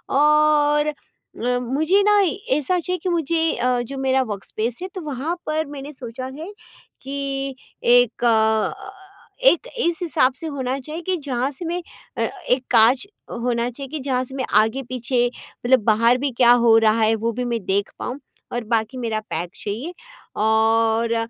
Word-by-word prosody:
और 300 Hz, 0 st, +4 dB
अ, 300 Hz, -, -1 dB, 0.7 s
मुझे 310 Hz, +11 st, +2 dB
ना 415 Hz, 0 st, +5 dB, 0.4 s
ऐसा 355 Hz, +5 st, +1 dB
चाहिए 360 Hz, +2 st, -3 dB
कि 365 Hz, -, 0 dB
मुझे 330 Hz, -1 st, +1 dB
अ, 250 Hz, 0 st, +1 dB
जो 270 Hz, +3 st, -6 dB
मेरा 265 Hz, 0 st, +2 dB
वर्कस्पेस 220 Hz, +4 st, -4 dB
है 370 Hz, -, -3 dB
तो 370 Hz, -, -4 dB
वहाँ 300 Hz, +2 st, -3 dB
पर 310 Hz, +1 st, -1 dB
मैंने 285 Hz, +1 st, -8 dB
सोचा 250 Hz, 0 st, -7 dB
है 360 Hz, +6 st, -7 dB, 0.5 s
कि 275 Hz, 0 st, -4 dB, 0.3 s
एक 245 Hz, -1 st, +4 dB
अ -, -, +6 dB
अ, 220 Hz, -, +1 dB, 0.5 s
एक 435 Hz, +3 st, +4 dB
इस 345 Hz, -5 st, +1 dB
हिसाब 305 Hz, -7 st, +2 dB
से 320 Hz, +5 st, -7 dB
होना 260 Hz, -1 st, -2 dB
चाहिए 310 Hz, +5 st, -7 dB
कि 375 Hz, -, +2 dB
जहाँ 260 Hz, -1 st, -1 dB
से 290 Hz, +5 st, -6 dB
मैं 345 Hz, +2 st, -2 dB, 0.4 s
अ, -, -, -1 dB, 0.3 s
एक 255 Hz, +1 st, +2 dB
काँच 240 Hz, -, +5 dB, 0.4 s
होना 240 Hz, -1 st, 0 dB
चाहिए 270 Hz, +2 st, -8 dB
कि 310 Hz, -, -3 dB
जहाँ 260 Hz, -1 st, -1 dB
से 265 Hz, +1 st, -9 dB
मैं 260 Hz, -, -2 dB, 0.2 s
आगे 220 Hz, +5 st, -1 dB
पीछे 245 Hz, 0 st, -1 dB, 0.4 s
मतलब 255 Hz, 0 st, +5 dB
बाहर 230 Hz, +3 st, +4 dB
भी 275 Hz, 0 st, -1 dB
क्या 240 Hz, -1 st, +6 dB
हो 225 Hz, -1 st, +7 dB
रहा 225 Hz, 0 st, +3 dB
है 220 Hz, 0 st, +4 dB
वो 230 Hz, +2 st, -1 dB
भी 250 Hz, +2 st, -3 dB
मैं 235 Hz, -1 st, -1 dB
देख 200 Hz, +2 st, 0 dB
पाऊँ 255 Hz, +3 st, -4 dB, 0.3 s
और 240 Hz, 0 st, -2 dB
बाकी 225 Hz, +3 st, 0 dB
मेरा 225 Hz, -3 st, -2 dB
पैक 170 Hz, +2 st, -3 dB
चाहिए 235 Hz, -, -4 dB, 0.5 s
और 225 Hz, +1 st, +2 dB
260 Hz, 175 wpm, -22 LUFS, 230-300 Hz, 0.7 s, हो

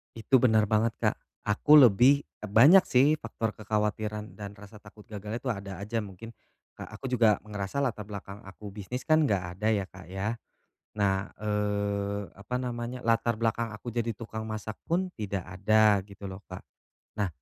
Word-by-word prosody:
Itu 125 Hz, +3 st, +3 dB
bener 110 Hz, -3 st, +4 dB
banget, 110 Hz, +1 st, +2 dB
Kak. -, -, +2 dB, 0.3 s
Aku 105 Hz, +8 st, +5 dB
lebih, 130 Hz, +4 st, +6 dB, 0.2 s
e -, -, -3 dB
banyak 140 Hz, -, +7 dB
sih 140 Hz, +5 st, +4 dB
faktor 115 Hz, -3 st, -3 dB
kekhawatiran 105 Hz, 0 st, -2 dB
dan 100 Hz, -1 st, -7 dB
rasa 105 Hz, +1 st, -13 dB
takut 105 Hz, 0 st, -15 dB
gagalnya 105 Hz, +2 st, -5 dB
itu 135 Hz, -, -3 dB
ada 100 Hz, -3 st, -6 dB
aja 115 Hz, +3 st, -2 dB
mungkin, 105 Hz, +3 st, -10 dB, 0.5 s
Kak. -, -, -8 dB
Aku -, -, -9 dB
juga 115 Hz, -5 st, +4 dB
ngerasa 105 Hz, +5 st, -3 dB
latar 115 Hz, -5 st, -2 dB
belakang 100 Hz, -1 st, -8 dB
aku 100 Hz, +2 st, -10 dB
bisnis 105 Hz, +6 st, -6 dB
kan 155 Hz, 0 st, +5 dB
enggak 90 Hz, -7 st, -1 dB
ada 105 Hz, -, -1 dB
ya, 100 Hz, -2 st, 0 dB
Kak, 95 Hz, -2 st, -13 dB
ya. 95 Hz, +3 st, -3 dB, 0.7 s
Nah, 100 Hz, -1 st, +1 dB
eee, 100 Hz, -1 st, -1 dB
apa 100 Hz, +6 st, -5 dB
namanya, 125 Hz, 0 st, -4 dB
latar 115 Hz, 0 st, +2 dB
belakang 115 Hz, +1 st, 0 dB
aku 115 Hz, +3 st, -7 dB
jadi 115 Hz, -1 st, -2 dB
tukang 110 Hz, -1 st, -6 dB
masak 110 Hz, 0 st, -5 dB
pun 180 Hz, +2 st, 0 dB
tidak 100 Hz, -4 st, -3 dB
ada 105 Hz, +2 st, +3 dB
gitu 100 Hz, 0 st, -12 dB
loh, 95 Hz, 0 st, -6 dB
Kak. -, -, -8 dB, 0.6 s
Nah, 100 Hz, -, +1 dB
105 Hz, 170 wpm, -28 LUFS, 100-115 Hz, 0.7 s, banyak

